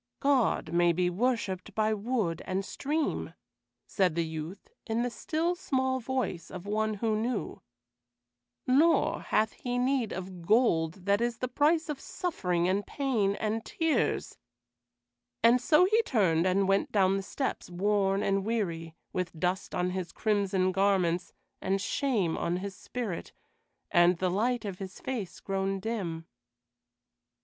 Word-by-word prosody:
"God 270 - +2
may 175 0 +4
be 180 +1 +1
worshiped 205 -3 -1
by 220 0 +2
wood 210 -6 -1
and 190 +1 -2
stream," 300 +7 -2 0.5
said 185 -5 +1
the 170 -1 +1
youth, 160 +4 -6 0.2
in 225 +1 0
the 245 - -1
still, 330 +5 -1
small 260 -6 0
voice 250 -8 -3
of 185 0 -8
one 215 +1 0
who 220 +1 0
knew; 230 +1 -2 1.0
"nor 300 +6 +3
hath 220 0 +1
He 245 0 -4
need 250 -2 +1
of 185 -1 -6
gold 180 -4 +2
that 200 +2 +3
is 240 -1 0
the 255 - -2
price 305 +6 +2
of 295 -3 -4
suffering 180 - -1
and 195 +2 0
pain 230 -8 0
and 220 +1 -2
tears;" 320 -3 0 1.0
and 240 +2 +6
so 310 +6 +5
he 435 +4 +4
turned 185 - +2
and 190 +1 +2
went 195 0 +2
down 195 -2 +3
the 195 - -1
steps, 205 +5 -3
worn 195 +2 +1
and 195 0 +1
weary, 170 -7 -2 0.2
with 180 -3 -3
dust 180 +3 -1
on 180 0 0
his 185 -1 -4
crimson 195 -3 +1
garments, 185 -3 +1 0.3
and 195 +1 0
shame 205 - 0
on 175 +1 0
his 195 +1 -5
spirit, 225 -7 -5 0.6
and 175 0 +5
the 185 +1 0
light 235 +4 0
of 195 -3 -5
his 190 -1 -7
face 215 -9 -4
grown 195 0 -1
dim. 185 -7 -3
200 Hz, 145 wpm, -29 LUFS, 185-245 Hz, 1.0 s, and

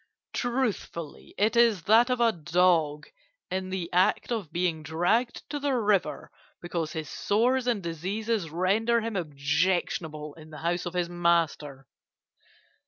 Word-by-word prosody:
Truthfully, 235 - -3
it 215 +3 +2
is 230 -7 +4
that 230 +6 +5
of 250 -1 0
a 235 -1 +4
dog 165 -3 +2 0.5
in 185 0 -2
the 185 -2 -3
act 180 +6 +2
of 210 -10 -3
being 170 -2 -1
dragged 175 - 0
to 295 - -2
the 280 -2 0
river 210 -5 0 0.3
because 170 -2 -3
his 155 -2 -4
sores 245 +5 +1
and 225 -6 0
diseases 190 +4 -2
render 210 +8 +1
him 225 -1 -4
objectionable 155 -1 -1
in 155 0 -14
the 155 - -10
house 175 +1 0
of 175 - -6
his 175 -1 0
master. 165 -5 0
180 Hz, 140 wpm, -27 LUFS, 165-225 Hz, 0.5 s, that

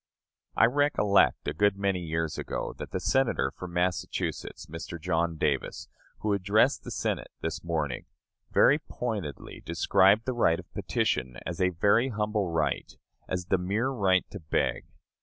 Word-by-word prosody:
I - - +6
recollect, 115 - +3
a - - 0
good 100 +3 +2
many 100 -2 0
years 80 -2 -2
ago, - - -4
that - - -6
the - - -3
Senator 135 -2 +1
from 90 -1 -8
Massachusetts 90 +1 -2
[Mr. 80 +1 -7
John 85 0 0
Davis], 75 -3 -1 0.3
who 105 -1 +1
addressed 100 +2 +2
the - - -7
Senate - - -2
this 80 - -3
morning, 80 -7 -2 0.4
very 145 - +5
pointedly 105 - -5
described 100 +4 +3
the 130 - -1
right 85 -9 +2
of - - -13
petition 65 -1 -1
as 85 +1 -4
a 90 - +4
very 100 +8 +3
humble 105 -4 -1
right 75 -4 -1 0.4
as 90 -1 -2
the 95 0 +1
mere 105 +8 0
right 95 -8 +2
to 100 - -7
beg. 75 - -1
95 Hz, 155 wpm, -28 LUFS, 80-105 Hz, 0.4 s, I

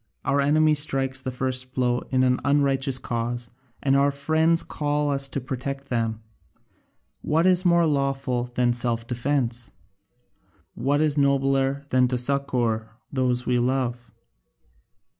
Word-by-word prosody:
Our 140 0 +2
enemy 155 +2 +3
strikes 135 -3 0
the 130 - -4
first 130 0 -3
blow 125 -1 +1
in 130 -1 +2
an 125 0 +2
unrighteous 140 -2 +1
cause, 120 -1 -4 0.3
and 135 -1 +3
our 140 +1 +4
friends 160 +4 +1
call 145 -1 -1
us 135 -1 +1
to 135 - -3
protect 135 +2 -5
them. 115 -2 -2 1.0
What 160 +3 +1
is 185 0 +4
more 170 -1 +4
lawful 135 -4 0
than 120 0 0
self 120 -1 -1
defence? 120 -1 -2 1.0
What 140 +5 0
is 150 -2 +2
nobler 135 0 +1
than 125 0 +3
to 125 0 -1
succour 120 -4 0 0.2
those 125 -2 0
we 125 -1 +1
love? 125 -1 -1
135 Hz, 135 wpm, -24 LUFS, 125-140 Hz, 1.0 s, our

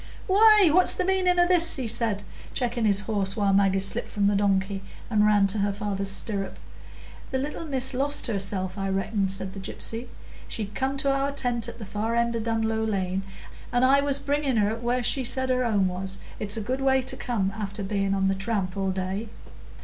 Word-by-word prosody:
"Why, 415 -2 +6
what's 365 +2 +5
the 370 - -1
meaning 370 -1 +2
o' 350 - +6
this?" 345 -2 +3
he 260 - -3
said, 220 -3 -1 0.3
checking 240 -2 -1
his 200 -1 +4
horse, 200 -2 -1
while 200 -2 +2
Maggie 195 -1 +3
slipped 195 +1 0
from 205 -1 -1
the 200 0 +3
donkey 195 -1 +1 0.3
and 210 -1 +4
ran 205 -2 +4
to 200 +2 -2
her 200 0 +1
father's 200 -1 -2
stirrup. 195 0 -1 0.7
"The 265 - -1
little 295 +5 -4
miss 265 -3 0
lost 285 +3 0
herself, 195 -3 -2
I 195 0 -2
reckon," 195 +1 -1
said 190 0 -4
the 200 - -7
gypsy. 225 +4 -6 0.4
"She'd 210 -2 -5
come 270 +3 -1
to 275 -1 +1
our 275 +1 0
tent 245 -5 0
at - - -10
the 220 - -8
far 215 +4 -2
end 235 0 +1
o' - - -1
Dunlow 225 0 -1
Lane, 190 -3 -1 0.5
and 245 +1 +3
I 275 +2 +5
was 280 -1 +3
bringing 280 -3 0
her 210 +1 +2
where 240 +2 -1
she 265 +3 0
said 260 +1 +1
her 255 0 +1
home 205 -5 +2
was. 190 +1 -4 0.2
It's 210 +1 +1
a - - -2
good 255 +5 -3
way 265 -1 +3
to 260 - -2
come 205 -6 -1
after 205 -1 -5
being 195 0 0
on 195 -1 +1
the 195 - +2
tramp 195 -2 -2
all 195 -1 -1
day." 190 +4 -3
220 Hz, 210 wpm, -26 LUFS, 195-260 Hz, 0.7 s, Why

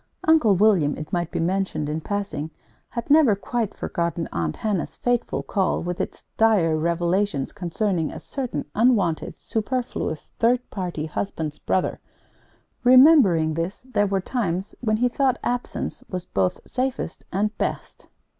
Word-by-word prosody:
Uncle 310 -11 +5
William, 185 -7 +3
it 155 - -8
might 175 -1 0
be - - -3
mentioned 175 -3 -1
in 155 +2 -2
passing, 195 -6 -3 0.4
had 235 +3 -4
never 290 -8 +6
quite 220 +1 -2
forgotten 170 -1 -2
Aunt 80 -2 -2
Hannah's 205 -6 -2
fateful 245 -1 -1
call 190 -4 0
with 175 0 -2
its - - -6
dire 205 -8 +4
revelations 170 -1 0
concerning 180 -2 -1
a - - -7
certain 250 - -4
unwanted, 210 -8 +2
superfluous, 225 - -3
third 245 +2 +2
party 175 -5 -3
husband's 155 -2 -4
brother. 185 - 0 0.8
Remembering 250 - +6
this, 165 +5 -3
there 250 -5 0
were 195 -1 0
times 190 -4 -2
when 215 -3 +1
he 245 +2 +3
thought 260 0 +1
absence 245 0 -3
was 180 -1 -4
both 95 - 0
safest 255 -8 -3
and 210 +3 0
best. - - -4
195 Hz, 140 wpm, -24 LUFS, 165-235 Hz, 0.8 s, never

